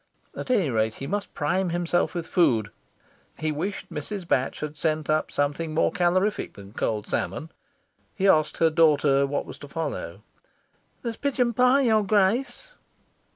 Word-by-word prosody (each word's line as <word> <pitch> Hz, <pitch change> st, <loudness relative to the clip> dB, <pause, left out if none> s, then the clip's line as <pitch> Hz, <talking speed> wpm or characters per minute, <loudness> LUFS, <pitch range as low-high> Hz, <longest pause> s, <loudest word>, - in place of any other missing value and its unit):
At -, -, -6 dB
any 200 Hz, -, +2 dB
rate, 110 Hz, -1 st, 0 dB
he 135 Hz, -, -6 dB
must 205 Hz, +6 st, -3 dB
prime 180 Hz, +5 st, 0 dB
himself 175 Hz, +1 st, 0 dB
with 170 Hz, -2 st, -3 dB
food. 120 Hz, -, +2 dB, 0.7 s
He 155 Hz, 0 st, -1 dB
wished 185 Hz, +7 st, -4 dB
Mrs. 175 Hz, +4 st, -5 dB
Batch 130 Hz, -4 st, 0 dB
had 150 Hz, 0 st, -4 dB
sent 155 Hz, -1 st, -1 dB
up 155 Hz, 0 st, +1 dB
something 145 Hz, +3 st, -1 dB
more 160 Hz, -, +3 dB
calorific 185 Hz, +2 st, +1 dB
than 100 Hz, 0 st, -13 dB
cold 105 Hz, -2 st, -2 dB
salmon. 100 Hz, -, -3 dB, 0.6 s
He 195 Hz, -1 st, +1 dB
asked 155 Hz, -5 st, +3 dB
her 165 Hz, -1 st, +3 dB
daughter 145 Hz, -4 st, +4 dB
what 140 Hz, +1 st, -2 dB
was -, -, -10 dB
to 145 Hz, -, -9 dB
follow. 140 Hz, -, -5 dB, 0.8 s
"There's 230 Hz, -2 st, -4 dB
a -, -, -35 dB
pigeon 255 Hz, -4 st, +1 dB
pie, 250 Hz, +3 st, +4 dB
your 220 Hz, -5 st, +3 dB
Grace." 215 Hz, -, +1 dB
165 Hz, 160 wpm, -25 LUFS, 145-200 Hz, 0.8 s, daughter